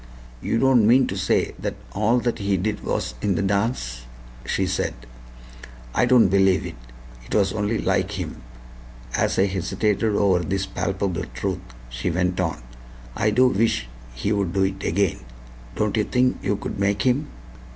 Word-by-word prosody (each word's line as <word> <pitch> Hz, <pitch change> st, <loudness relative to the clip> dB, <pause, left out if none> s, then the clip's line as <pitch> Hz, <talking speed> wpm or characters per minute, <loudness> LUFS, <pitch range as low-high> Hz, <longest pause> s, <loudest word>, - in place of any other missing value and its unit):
"You 115 Hz, -, 0 dB
don't 125 Hz, -3 st, +4 dB
mean 130 Hz, +3 st, +6 dB
to 95 Hz, -, -3 dB
say 95 Hz, 0 st, +1 dB
that -, -, -3 dB, 0.2 s
all 110 Hz, -, +2 dB
that 120 Hz, -1 st, -1 dB
he 100 Hz, -1 st, +1 dB
did 105 Hz, +3 st, -2 dB
was -, -, -2 dB
in 100 Hz, -, +1 dB
the 80 Hz, -, 0 dB
dance?" 95 Hz, -, -1 dB, 0.4 s
she -, -, +1 dB
said. -, -, -1 dB, 1.0 s
"I 125 Hz, -, +3 dB
don't 120 Hz, -4 st, +6 dB
believe 95 Hz, 0 st, +3 dB
it. -, -, -6 dB, 0.5 s
It -, -, -3 dB
was 100 Hz, -2 st, +2 dB
only 105 Hz, +1 st, 0 dB
like 95 Hz, 0 st, 0 dB
him." 85 Hz, -10 st, -5 dB, 0.7 s
As -, -, +1 dB
I 95 Hz, -, +4 dB
hesitated 100 Hz, +3 st, 0 dB
over 100 Hz, -3 st, +3 dB
this 95 Hz, +3 st, -1 dB
palpable 95 Hz, -2 st, -2 dB
truth, -, -, -2 dB, 0.3 s
she -, -, -3 dB
went 90 Hz, +1 st, 0 dB
on: 80 Hz, -8 st, -1 dB, 0.5 s
"I 110 Hz, -, +2 dB
do 125 Hz, +5 st, +4 dB
wish 95 Hz, -, +1 dB, 0.3 s
he'd 100 Hz, -, -1 dB
do 95 Hz, 0 st, +2 dB
it 95 Hz, 0 st, -2 dB
again. 95 Hz, +1 st, +1 dB, 0.6 s
Don't 105 Hz, -1 st, 0 dB
you 110 Hz, -, +2 dB
think 125 Hz, +3 st, +1 dB
you 105 Hz, -, 0 dB
could 100 Hz, -, -5 dB
make 100 Hz, +1 st, +1 dB
him?" 135 Hz, +4 st, +1 dB
100 Hz, 165 wpm, -23 LUFS, 95-110 Hz, 1.0 s, mean